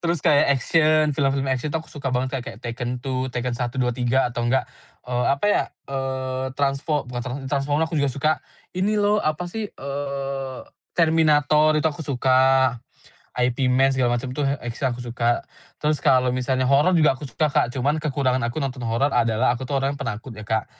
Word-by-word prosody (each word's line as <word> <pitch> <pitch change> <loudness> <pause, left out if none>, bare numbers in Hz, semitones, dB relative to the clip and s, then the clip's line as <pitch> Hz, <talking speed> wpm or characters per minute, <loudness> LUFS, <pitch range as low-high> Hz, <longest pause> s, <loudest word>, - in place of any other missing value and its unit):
Terus 170 0 0
kayak, 145 -1 +5
action, 155 +3 +3
film-film 135 -1 0
action 130 +3 -2
tuh 160 +2 -3
aku - - -19
suka 140 -2 -4
banget 130 +1 -1
kayak 125 -2 -10
Tekken 120 +1 -3
2, 130 -1 -2
Tekken 125 0 -3
1, 120 +1 -3
2, 125 -2 +1
3 125 +2 +1
atau 120 - -3
enggak, 130 +2 +2 0.4
eee, 125 0 -1
apa 140 +5 0
ya, - - +3 0.2
eee, 130 -1 -3
transfo 140 +1 0
bukan 125 -1 -5
transfo 125 +3 -5
Transformers 145 +3 0
aku 155 - +1
juga 140 - +2
suka. 140 +4 +1 0.4
Ini 195 +4 0
loh, 205 0 +2
apa 155 +3 -1
sih, 210 +4 -4
eee, 140 -2 -5 0.3
Terminator 155 -2 +4
itu 155 - 0
aku 150 - -10
suka. 130 -2 +3 0.6
Ip 125 +1 0
Man, 135 +2 +3
segala 125 -2 +1
macem 125 +1 -4
tuh, 140 +1 -1
X-men 125 -2 -2
aku 120 - -7
suka. 120 0 0 0.3
Terus 150 0 0
kalo 130 -1 +3
misalnya 130 +1 0
horor 145 +7 +4
juga 155 -4 +5
aku 135 +1 -8
suka, 150 +1 0
Kak, - - +2
cuman 140 +5 -1
kekurangan 135 -4 0
aku 120 - -7
nonton 130 -1 -4
horor 135 +5 +1
adalah 115 +2 +2
aku 125 +1 -5
tuh 140 - 0
orangnya 135 +1 -1
penakut 115 +2 -5
ya, 110 - -10
Kak. 110 0 -1
135 Hz, 190 wpm, -23 LUFS, 125-145 Hz, 0.6 s, kayak